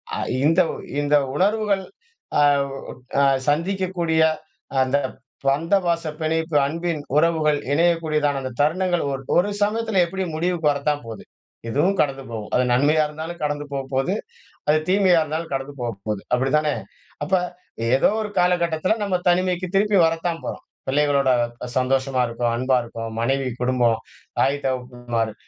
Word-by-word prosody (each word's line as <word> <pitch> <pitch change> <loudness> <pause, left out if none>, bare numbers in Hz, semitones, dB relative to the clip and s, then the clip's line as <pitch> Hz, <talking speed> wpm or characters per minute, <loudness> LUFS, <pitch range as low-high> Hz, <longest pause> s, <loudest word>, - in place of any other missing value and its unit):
அ - - -3 0.3
இந்த 165 +4 +5 0.4
இந்த 145 0 +2 0.2
உணர்வுகள் 200 +2 +1 0.6
அவ் 140 -1 +3 0.5
அ - - +4 0.3
சந்திக்கக்கூடிய 170 0 0 0.6
அந்த 130 +2 +1 0.5
பந்த 150 +7 +2
பாச 170 -1 +1 0.2
பிணைப்பு 160 0 -1
அன்பின் 165 +1 -2 0.2
உறவுகள் 155 -2 +3
இணையக்கூடியதான 155 -3 +2
அந்த 130 -1 -4
தருணங்கள் 175 +3 +1
ஒரு 135 0 -3 0.2
ஒரு 180 +4 +3
சமயத்தில 215 -1 +2
எப்பிடியும் 180 -2 -4
முடிவுக்கு 170 -1 +1
வரத்தான் 145 0 -1
போது. 110 -2 -8 0.5
இதுவும் 170 - +1
கடந்து 135 -2 -1
போகும். 110 -2 -6
அது 125 - +4
நன்மையா 145 +5 +4
இருந்தாலும் 160 +3 -7
கடந்து 145 0 -1
போப்போது. 135 +4 -1 0.6
அது 150 +1 +5
தீமையா 185 -3 +4
இருந்தாலும் 155 +1 -4
கடந்து 135 +1 -3
போப்போது. 105 -3 -3
அப்பிடி 130 +2 +2
தானே! 150 -1 0 0.5
அப்ப 150 - -9 0.6
ஏதோ - - +4
ஒரு 210 - -4
காலகட்டத்தில 175 +1 +2
நம்ம 200 -3 +1
தனிமைக்கு 180 0 +1
திருப்பி 205 +1 +3
வரத்தான் 165 +1 -1
போறோம். - - -5 0.2
பிள்ளைகளோட 140 -1 +2 0.5
சந்தோஷமா 130 0 +1
இருக்கோம். 115 0 -1
அன்பா 130 +2 +2
இருக்கோம். 115 -1 -6
மனைவி, 135 +3 0
குடும்பம், 125 -2 +2 0.4
தாய், 140 +1 +3
தகப்பன்மார் 120 -3 -2
150 Hz, 130 wpm, -22 LUFS, 135-175 Hz, 0.6 s, இந்த